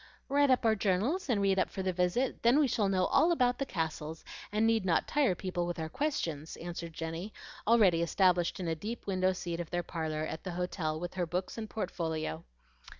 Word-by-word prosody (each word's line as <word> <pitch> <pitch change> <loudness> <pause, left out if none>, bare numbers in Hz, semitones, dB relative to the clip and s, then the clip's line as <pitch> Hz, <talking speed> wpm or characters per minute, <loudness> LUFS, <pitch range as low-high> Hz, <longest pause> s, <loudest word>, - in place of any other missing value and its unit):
"Write 285 0 +4 0.2
our 220 - +5
journals 220 - 0
and 210 -5 +2
read 195 -1 +3
up - - +1
for 190 - -4
the 185 -1 0
visit; 180 +9 0
then 240 +4 +5
we 300 -2 +4
shall 210 -4 +1
know 185 -1 +2
all 340 - +4
about 250 -6 +2
the 275 - -1
castle, 160 -1 -3 0.3
and 215 +2 +2
need 225 -2 +3
not 175 -3 +2
tire 275 -10 +2
people 175 -1 -2
with 175 - -3
our 160 -1 -3
questions," 165 - -2
answered 170 0 -6
Jenny, 165 +5 -5 0.4
already 205 -7 +5
established 175 +1 +2
in 180 - -3
a 165 - +1
deep 215 +9 -6
window 185 -1 +2
seat 175 -2 -4
of 170 - -4
their 175 0 -1
parlor 155 -3 -3
at 160 - -6
the 185 - -4
hotel 170 -3 -2
with 175 +1 -5
her 180 -2 -1
books 180 +3 -3
and 220 -2 -5
portfolio. 160 - -3
185 Hz, 210 wpm, -31 LUFS, 165-220 Hz, 0.4 s, our